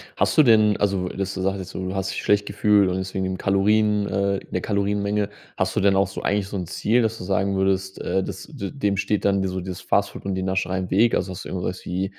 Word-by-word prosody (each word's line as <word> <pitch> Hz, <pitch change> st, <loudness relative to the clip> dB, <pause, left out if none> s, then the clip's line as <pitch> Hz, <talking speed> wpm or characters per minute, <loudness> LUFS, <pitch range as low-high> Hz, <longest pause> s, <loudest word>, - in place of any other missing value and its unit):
Hast -, -, +1 dB
du 155 Hz, -, +8 dB
denn 110 Hz, -4 st, +5 dB
also 95 Hz, -3 st, 0 dB
dass 95 Hz, -1 st, -3 dB
du -, -, -4 dB
sagst, 95 Hz, +1 st, 0 dB
jetzt 95 Hz, 0 st, -7 dB
so: 95 Hz, -, -5 dB
Du 95 Hz, -, -3 dB
hast 95 Hz, 0 st, -2 dB
dich -, -, -4 dB
schlecht 105 Hz, 0 st, +2 dB
gefühlt 100 Hz, -1 st, +3 dB
und 90 Hz, -, -1 dB
deswegen 95 Hz, 0 st, -3 dB
im 95 Hz, 0 st, -2 dB
Kalorien, 105 Hz, +1 st, +2 dB
äh 100 Hz, 0 st, 0 dB
'ne 90 Hz, -, -1 dB
Kalorienmenge, 100 Hz, 0 st, 0 dB, 0.3 s
hast -, -, 0 dB
du -, -, +2 dB
denn 100 Hz, -1 st, +4 dB
auch 95 Hz, -1 st, +3 dB
so 95 Hz, -, -7 dB
eigentlich 100 Hz, -1 st, 0 dB
so 100 Hz, -, -7 dB
'n 90 Hz, -2 st, -2 dB
Ziel, 110 Hz, +7 st, +1 dB
dass 115 Hz, 0 st, 0 dB
du 90 Hz, -, -7 dB
sagen 100 Hz, +1 st, 0 dB
würdest, 95 Hz, 0 st, 0 dB
äh, 95 Hz, +2 st, 0 dB
dass -, -, -7 dB
d 100 Hz, -, -6 dB
dem 105 Hz, -8 st, 0 dB
steht 100 Hz, +1 st, -1 dB
dann 100 Hz, -1 st, +3 dB
dir 95 Hz, -, -1 dB
so 95 Hz, 0 st, -3 dB
dieses 90 Hz, 0 st, -6 dB
Fast -, -, +1 dB
Food -, -, -10 dB
und 100 Hz, -, -1 dB
die 95 Hz, -, -2 dB
Nascherei 95 Hz, -1 st, -1 dB
im 90 Hz, -1 st, -4 dB
Weg. 115 Hz, +5 st, +4 dB
Also 95 Hz, +1 st, 0 dB
hast 85 Hz, -, -7 dB
du -, -, -8 dB
irgendwas 90 Hz, 0 st, -4 dB
wie, 95 Hz, +2 st, -1 dB
95 Hz, 270 wpm, -23 LUFS, 95-100 Hz, 0.3 s, du